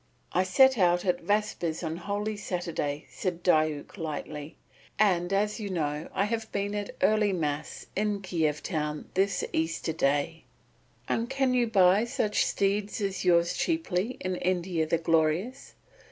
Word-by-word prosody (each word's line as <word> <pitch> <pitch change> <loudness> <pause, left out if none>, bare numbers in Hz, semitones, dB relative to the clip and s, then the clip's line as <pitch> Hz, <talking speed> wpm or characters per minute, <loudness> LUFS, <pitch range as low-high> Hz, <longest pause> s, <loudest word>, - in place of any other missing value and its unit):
"I 180 - +3
set 265 +6 +5
out 175 0 +3
at 180 -1 +1
vespers 205 -6 -1
on 160 0 -3
Holy 205 +4 -3
Saturday," 170 -7 -3
said 175 -3 -3
Diuk 155 0 +1
lightly, 150 -1 -5 0.4
"and 180 -4 +2
as 210 +3 +1
you 205 -2 -4
know, 150 -3 -2
I 195 - +1
have 225 0 -3
been 200 +1 -2
at 205 -1 -4
early 210 +1 +4
Mass 155 -4 -3
in 205 0 -1
Kiev 160 -5 -1
town 150 -3 -3
this 195 +1 +1
Easter 160 0 -1
day." 145 +2 0 0.6
"And 230 +1 -1
can 270 -1 +1
you 245 -1 +2
buy 195 0 +4
such 225 -4 0
steeds 200 +2 0
as 195 -2 -2
yours 170 -1 +3
cheaply 250 - -1
in 185 -1 -2
India 175 -3 0
the 170 - +2
Glorious?" 165 - 0
185 Hz, 150 wpm, -28 LUFS, 160-210 Hz, 0.6 s, set